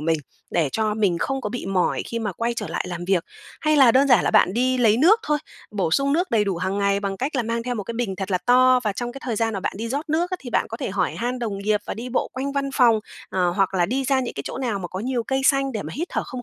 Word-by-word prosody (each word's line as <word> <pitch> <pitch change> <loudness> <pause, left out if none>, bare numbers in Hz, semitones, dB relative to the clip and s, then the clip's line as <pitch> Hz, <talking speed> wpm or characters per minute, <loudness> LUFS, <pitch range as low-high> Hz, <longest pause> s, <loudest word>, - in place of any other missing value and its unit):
mình 160 0 +1 0.3
để 160 -5 +1
cho 215 -1 0
mình 195 -6 +1
không 270 +6 -1
có 210 - -4
bị 245 - -5
mỏi 190 -2 +1
khi 230 - -3
mà 210 -4 -3
quay 235 +5 -2
trở 210 -4 -4
lại - - -2
làm 175 0 -5
việc. 185 -2 +1 0.4
Hay 305 0 +2
là 260 -5 +7
đơn 275 +2 +4
giản 240 -7 +5
là - - +2
bạn 185 - +4
đi 255 +1 +1
lấy 225 -2 +4
nước 385 - +5
thôi, 300 0 0 0.3
bổ 195 -6 -1
sung 275 +9 +2
nước 355 +4 +1
đầy 215 -3 +3
đủ 195 -3 -1
hàng 190 +3 -2
ngày 200 0 +1
bằng 195 -1 -3
cách 275 +4 -2
là 245 - +1
mang 230 +1 -2
theo 245 0 -3
một 205 -4 -4
cái 235 - -5
bình 220 -6 -2
thật 195 0 -4
là 185 - +2
to 255 0 +5
và 210 - +1
trong 240 +4 -4
cái 275 - -9
thời 235 -4 -2
gian 225 -1 0
mà 195 - -3
bạn - - -2
đi 225 +3 -4
rót 285 +6 -3
nước 345 +4 +1
á, 370 - -1
thì 250 - -8
bạn - - +1
có 225 - -5
thể 205 - -4
hỏi 195 - -1
han 245 +2 -2
đồng 215 -5 -3
nghiệp 210 +1 +1
và - - -3
đi 240 +3 -6
bộ 250 - -1
quanh 275 +2 -3
văn 275 -1 -1
phòng, 235 -4 +4 0.3
ờ, 180 -2 +1
hoặc 195 +1 0
là 175 -2 +2
đi 265 +4 -1
ra 265 0 +2
những 250 - -4
cái 140 - -4
chỗ - - -5
nào 235 -6 -1
mà 180 - -5
có 185 - -5
nhiều 245 +1 -1
cây 265 +3 -1
xanh 275 -1 +3
để 215 - -3
mà - - -7
hít 340 +4 -3
thở - - -1
không 255 -2 -7
230 Hz, 320 wpm, -23 LUFS, 200-260 Hz, 0.4 s, là